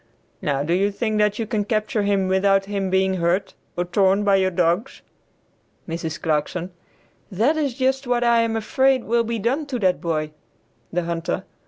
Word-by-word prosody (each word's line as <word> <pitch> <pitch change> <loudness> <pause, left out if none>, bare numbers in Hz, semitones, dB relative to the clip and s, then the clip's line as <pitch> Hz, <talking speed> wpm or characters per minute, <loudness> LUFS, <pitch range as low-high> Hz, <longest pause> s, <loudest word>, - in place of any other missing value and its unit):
Now 140 -6 0
do 165 +4 0
you 195 +3 +2
think 215 +1 -2
that 210 0 +2
you 225 - -2
can 210 -1 -1
capture 215 +1 -1
him 200 -2 +1
without 195 +1 +2
his 195 -1 -2
being 190 0 +1
hurt, 175 +3 0 0.2
or 175 - 0
torn 195 +2 +2
by 200 -1 +4
your 190 -1 +2
dogs?" 175 +7 -1 0.8
Mrs. 165 -1 -4
Clarkson. 165 +4 -1 0.6
"That 230 - +2
is 285 -6 -1
just 265 0 0
what 245 -1 +1
I 235 -1 +4
am 230 -1 0
afraid 260 +3 +2
will 235 +1 +1
be 230 0 -3
done 265 +8 -1
to 265 -3 -3
that 185 -5 +1
boy." 155 -2 -2 0.6
The 175 0 -1
Hunter. 165 0 -3
200 Hz, 180 wpm, -22 LUFS, 180-230 Hz, 0.8 s, by